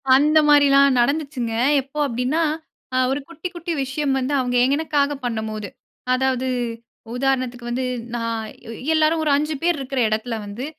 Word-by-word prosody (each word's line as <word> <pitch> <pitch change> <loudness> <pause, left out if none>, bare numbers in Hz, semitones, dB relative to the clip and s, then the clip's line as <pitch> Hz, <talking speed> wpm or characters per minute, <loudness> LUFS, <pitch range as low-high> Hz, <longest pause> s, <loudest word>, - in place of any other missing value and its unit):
அந்த 300 +3 +4
மாரிலாம் 280 -2 +6
நடந்துச்சுங்க. 280 -2 0 0.3
எப்போ 275 +3 -14
அப்டின்னா, 250 +6 -1 0.5
அ - - +1
ஒரு 275 - 0
குட்டி 335 +1 -6
குட்டி 345 0 -3
விஷயம் 270 +1 -1
வந்து 265 +2 -2
அவுங்க 250 -1 0 0.2
எனக்காக 290 -2 0
பண்ணம்போது, 220 -3 -3 0.5
அதாவது, 260 0 0 0.7
உதாரணத்துக்கு 250 -2 -1
வந்து, 255 +2 -1 0.3
நான் 230 -1 -3 0.2
எ - - -5 0.2
எல்லாரும், 315 +1 +3
ஒரு 300 - +2
5 305 +1 -1
பேர் 345 -1 +2
இருக்கிற 270 -1 -3
எடத்தில 220 +1 -2
வந்து, 205 +6 -6
265 Hz, 145 wpm, -22 LUFS, 245-295 Hz, 0.7 s, மாரிலாம்